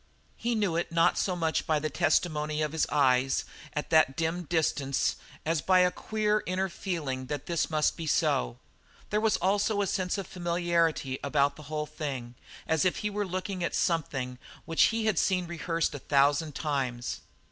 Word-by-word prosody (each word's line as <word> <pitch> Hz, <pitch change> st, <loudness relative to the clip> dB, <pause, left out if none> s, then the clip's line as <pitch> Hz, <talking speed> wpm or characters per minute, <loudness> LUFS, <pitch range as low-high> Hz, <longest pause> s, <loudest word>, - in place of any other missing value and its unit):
He 235 Hz, 0 st, -1 dB
knew 205 Hz, -6 st, +1 dB
it 170 Hz, -, -2 dB
not 165 Hz, 0 st, +4 dB
so 185 Hz, -, 0 dB
much 165 Hz, -2 st, 0 dB
by 155 Hz, -, +3 dB
the 155 Hz, +1 st, -2 dB
testimony 155 Hz, -2 st, +1 dB
of 150 Hz, -, -1 dB
his 160 Hz, 0 st, +1 dB
eyes 135 Hz, -2 st, +2 dB, 0.3 s
at 150 Hz, -, -4 dB
that 155 Hz, -4 st, +4 dB
dim 165 Hz, +2 st, -1 dB
distance 145 Hz, -4 st, 0 dB, 0.3 s
as 160 Hz, -1 st, +1 dB
by 185 Hz, -1 st, +4 dB
a 180 Hz, 0 st, +4 dB
queer, 215 Hz, +2 st, 0 dB
inner 190 Hz, +1 st, 0 dB
feeling 150 Hz, -9 st, -4 dB
that 145 Hz, -1 st, -4 dB
this 170 Hz, -2 st, 0 dB
must 155 Hz, -1 st, +1 dB
be 165 Hz, -2 st, -5 dB
so. -, -, +1 dB, 0.5 s
There 210 Hz, 0 st, +2 dB
was 220 Hz, -1 st, +3 dB
also 205 Hz, +2 st, +1 dB
a 200 Hz, -, +2 dB
sense 185 Hz, -1 st, -1 dB
of 195 Hz, -, -3 dB
familiarity 170 Hz, -6 st, 0 dB
about 140 Hz, 0 st, +2 dB
the 155 Hz, -, -11 dB
whole 155 Hz, -1 st, -2 dB
thing, 140 Hz, -6 st, -5 dB, 0.3 s
as 160 Hz, -2 st, +1 dB
if 185 Hz, -, +1 dB
he 210 Hz, -, 0 dB
were 205 Hz, 0 st, -2 dB
looking 185 Hz, 0 st, -3 dB
on -, -, -1 dB
something 135 Hz, -7 st, -1 dB, 0.3 s
which 165 Hz, 0 st, +4 dB
he 225 Hz, 0 st, 0 dB
had 215 Hz, -6 st, +2 dB
seen 180 Hz, -2 st, +1 dB
rehearsed 170 Hz, -1 st, -1 dB
a 145 Hz, -, -5 dB
thousand 145 Hz, +2 st, +2 dB
times. 130 Hz, -5 st, -2 dB
160 Hz, 180 wpm, -29 LUFS, 145-180 Hz, 0.5 s, not